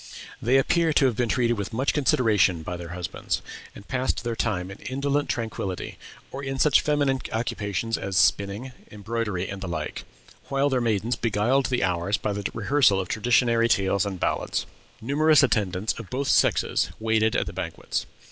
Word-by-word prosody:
They 125 +4 +3
appear 165 +4 +2
to 140 - +4
have 125 -4 +2
been 120 0 0
treated 120 -2 +1
with 100 +3 -4
much 130 +5 +1
consideration 105 - +2
by 90 - -4
their 85 -1 -7
husbands; 90 -2 -3 0.3
and 100 - -12
passed 130 -1 -1
their 120 -1 -2
time 95 -5 -2
in 100 - -10
indolent 140 +2 -1
tranquillity, 110 -5 -4 0.3
or 135 +1 -6
in 135 -1 -3
such 145 0 +4
feminine 145 -3 +1
occupations 110 0 -2
as 95 -1 -3
spinning, 100 +8 +2 0.2
embroidery, 105 -3 -3
and 95 -1 -6
the 95 - -4
like; 80 -3 -4 0.5
while 140 +1 +2
their 130 -2 +1
maidens 115 +1 0
beguiled 115 +5 +1
the 125 -4 0
hours 90 +2 0
by 105 - -2
the 100 -1 -3
rehearsal 115 -3 +3
of 95 - -4
traditionary 115 +1 +2
tales 100 -1 +2
and 100 -3 -4
ballads. - - -1 0.4
"Numerous 150 +5 +4
attendants 105 -5 +1
of 115 - -9
both 135 +2 -2
sexes - - +2
waited 110 0 +1
at - - +1
the - - -7
banquets. - - -4
115 Hz, 175 wpm, -25 LUFS, 100-130 Hz, 0.5 s, to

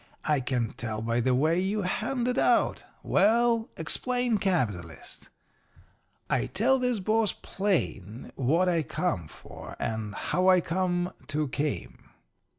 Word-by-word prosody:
I 150 -2 +2
can 125 -3 -1
tell 110 -2 -4
by 115 +1 0
the 125 +1 +2
way 160 +6 +2
you 200 +2 -1
hand 235 +7 -1
it 250 +1 +1
out. - - +2 0.2
Well, 230 +3 +3
explain 245 +7 0
"capitalist."' 105 - -3 1.0
"I - - 0
tells 255 +7 +2
this 250 -3 +1
boss 215 +2 +1
plain 125 - -2
what 160 +8 +2
I 170 -2 +2
come 115 - -2
for - - -11
and 110 -2 -3
how 185 +1 0
I 185 -1 +6
come 175 +1 -1
to 150 0 -1
came. 145 +2 -4
175 Hz, 135 wpm, -28 LUFS, -, 1.0 s, I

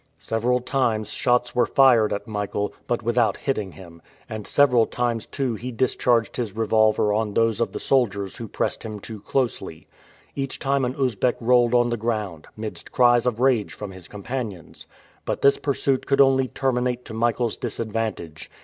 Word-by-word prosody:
Several 120 +3 0
times 125 -4 -1
shots 125 0 +1
were 125 - +2
fired 125 -6 +5
at 100 - -3
Michael, 105 -1 -3
but 120 -1 -1
without 115 -2 +1
hitting 105 -10 -2
him, 85 0 -13 0.3
and 110 -2 -6
several 125 -5 +4
times 120 -2 -2
too 135 -4 -2
he 120 +4 -5
discharged 120 -1 +1
his 110 -5 -3
revolver 110 -1 +3
on 105 -1 -1
those 115 0 +2
of 115 - 0
the - - -5
soldiers 100 -7 0
who 115 - -6
pressed - - -2
him 110 -2 -6
too 110 +1 -8
closely. 105 - -2 0.5
Each 135 -1 -3
time 135 -1 0
an 125 +1 -3
Usbeck 125 -3 +1
rolled 120 0 +3
on 120 0 +3
the 120 - -1
ground, 105 -8 -3
midst 110 0 -7
cries 120 -1 +4
of 120 -2 -1
rage 125 -5 +2
from 105 -2 -7
his 95 -2 -12
companions. 105 - -6 0.4
But - - -3
this 140 - +5
pursuit 135 -2 -1
could 140 - +2
only 135 -1 +5
terminate 125 -2 -1
to 110 - -8
Michael's 115 0 0
disadvantage. 110 -8 -4
115 Hz, 170 wpm, -23 LUFS, 105-125 Hz, 0.5 s, fired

